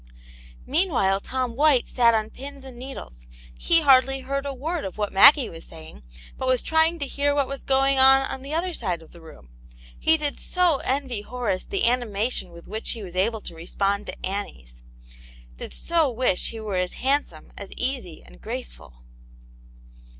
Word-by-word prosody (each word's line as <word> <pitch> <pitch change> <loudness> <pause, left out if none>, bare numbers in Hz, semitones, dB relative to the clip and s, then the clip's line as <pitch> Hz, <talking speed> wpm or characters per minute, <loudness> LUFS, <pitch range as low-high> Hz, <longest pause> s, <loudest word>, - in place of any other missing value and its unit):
Meanwhile 270 - +1
Tom 255 +2 -3
White 285 -2 +3
sat 235 -2 +3
on 215 0 -1
pins 275 0 -9
and 260 -2 -10
needles; 240 - -9 0.3
he 335 -1 +3
hardly 270 -2 +4
heard 275 +2 -3
a - - -2
word 315 +5 -3
of 190 - -6
what 210 -1 -2
Maggie 275 +7 +8
was 165 0 -10
saying, 160 - -12 0.4
but 260 - -2
was 255 -1 +2
trying 320 +1 +2
to 285 - -2
hear 285 +1 0
what 285 -1 +2
was 275 0 -6
going 270 0 +2
on 270 +1 +7
on 270 - -5
the 275 +2 -8
other 345 +3 -1
side 180 - -3
of 160 - -18
the 170 - -15
room. 110 - -15 0.5
He 320 0 +3
did 295 -2 -3
so 360 -5 +2
envy 260 -5 -2
Horace 235 -4 -3
the 395 - -1
anima 235 -2 +1
tion 185 - -4
with 170 0 -14
which 220 +2 -4
he 225 -3 -8
was 180 -2 -9
able 215 +4 0
to - - -8
respond 195 +5 -2
to - - -6
Annie's; 65 - -6 0.8
did - - -8
so 330 -4 +1
wish 245 -6 0
he 225 - -7
were 210 -3 -3
as 180 0 -1
handsome, 265 - -1
as 200 - -9
easy 250 - -4
and - - -17
graceful - - -8
250 Hz, 185 wpm, -24 LUFS, 190-275 Hz, 0.8 s, Maggie